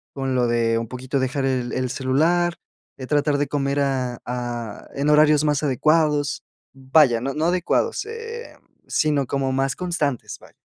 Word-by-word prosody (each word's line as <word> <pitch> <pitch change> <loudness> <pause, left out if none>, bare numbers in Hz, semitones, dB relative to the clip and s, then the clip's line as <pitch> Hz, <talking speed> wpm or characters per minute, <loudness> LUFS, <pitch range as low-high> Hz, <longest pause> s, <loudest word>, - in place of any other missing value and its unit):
con 135 -1 -2
lo 125 -1 +2
de 115 -1 +1
un 115 - -4
poquito 130 +3 -3
dejar 130 +1 -1
el 125 -2 -1
el 130 -1 -1
celular, 165 +7 +1 0.4
eh, 130 - -6
tratar 145 0 +2
de 145 0 0
comer 140 0 -1
a 130 -3 -1
a 120 -3 -5
en 140 +1 -1
horarios 150 0 +5
más 150 -1 +1
adecuados 150 +1 +1 0.3
Vaya, 130 -2 +3
no 135 +2 -2
no 155 +1 0
adecuados 185 - 0
em, 460 +2 -8 0.3
sino 150 -3 +1
como 135 0 -1
más 135 0 0
constantes, 160 -8 -2
vaya. - - -18
140 Hz, 165 wpm, -22 LUFS, 130-155 Hz, 0.4 s, horarios